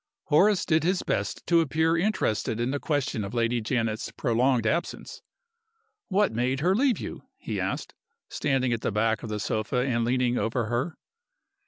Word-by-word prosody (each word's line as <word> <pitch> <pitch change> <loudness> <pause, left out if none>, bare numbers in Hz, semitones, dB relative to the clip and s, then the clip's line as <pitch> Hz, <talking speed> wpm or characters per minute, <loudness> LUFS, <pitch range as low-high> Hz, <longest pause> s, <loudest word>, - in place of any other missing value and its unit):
Horace 190 +5 +4
did 160 -2 +2
his 185 +2 +1
best 100 +2 -2
to 170 -1 +4
appear 160 0 +1
interested 165 - 0
in 120 +2 0
the 145 - -1
question 140 -8 -1
of 100 +4 -6
Lady 120 0 +1
Janet's 110 -1 -1
prolonged 125 -1 +1
absence. 170 +10 -2 0.9
"What 205 +1 +2
made 125 +4 0
her 180 +4 +3
leave 255 -2 +3
you?" - - -6 0.2
he - - -4
asked, - - -3 0.3
standing 130 -4 0
at 115 - -2
the - - -1
back 110 +1 +1
of 115 - -6
the 105 0 -3
sofa 110 +4 -1
and 120 -3 0
leaning 125 +1 +1
over 115 +1 -1
her. 120 +9 -2
125 Hz, 170 wpm, -27 LUFS, 115-160 Hz, 0.9 s, Horace